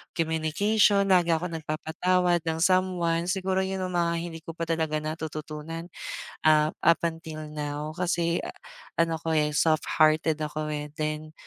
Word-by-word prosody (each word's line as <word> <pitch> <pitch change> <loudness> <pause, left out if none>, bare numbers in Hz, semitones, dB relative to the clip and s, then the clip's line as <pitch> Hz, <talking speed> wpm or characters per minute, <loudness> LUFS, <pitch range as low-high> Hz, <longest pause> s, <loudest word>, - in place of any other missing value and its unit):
communication, 195 +6 +2
lagi 175 -2 +5
akong 170 +2 -1
nagpapatawad 175 +3 +1
ng 160 - +1
someone. 180 -2 +2
Siguro 190 0 0
yun 190 0 -3
yung 185 - -3
mga 170 -1 +2
hindi 165 -1 -6
ko 165 - -7
pa 165 - -3
talaga 160 -2 -1
natututunan, 155 +1 -5 0.6
ah, 155 0 +5
up 170 +1 +5
until 160 -2 -6
now 150 0 -4
kasi 170 -1 +1 0.6
ano 165 -1 +2
ko, 165 -1 -1
eh, 150 -1 +2
soft-hearted 155 0 +3
ako, 150 0 -3
eh, 150 0 -3
then 155 0 -3
160 Hz, 140 wpm, -27 LUFS, 155-175 Hz, 0.6 s, lagi